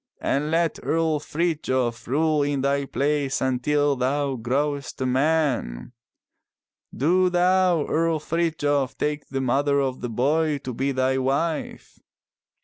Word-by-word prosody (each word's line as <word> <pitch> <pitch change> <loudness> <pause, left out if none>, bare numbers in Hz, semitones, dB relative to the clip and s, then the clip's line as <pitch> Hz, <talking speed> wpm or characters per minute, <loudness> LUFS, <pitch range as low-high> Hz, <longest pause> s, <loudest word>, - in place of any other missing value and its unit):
And 145 +2 -1
let 165 0 0
Earl 160 -2 0
Frithjof 145 -7 -1
rule 155 +3 +1
in 140 -1 0
thy 140 +1 0
place 140 0 -1
until 140 +3 +1
thou 135 +2 0
growest 140 +4 -2
a 130 - -1
man. 130 - 0 1.0
Do 180 +6 +2
thou. 180 -2 +3
Earl 165 0 +1
Frithjof, 150 -5 -1
take 150 0 -2
the 135 -1 -3
mother 140 +3 +1
of 130 -2 -2
the 125 - -3
boy 145 +6 +1
to 125 - -5
be 135 +4 -1
thy 130 0 +1
wife!" 140 +5 -2
145 Hz, 130 wpm, -24 LUFS, 130-160 Hz, 1.0 s, thou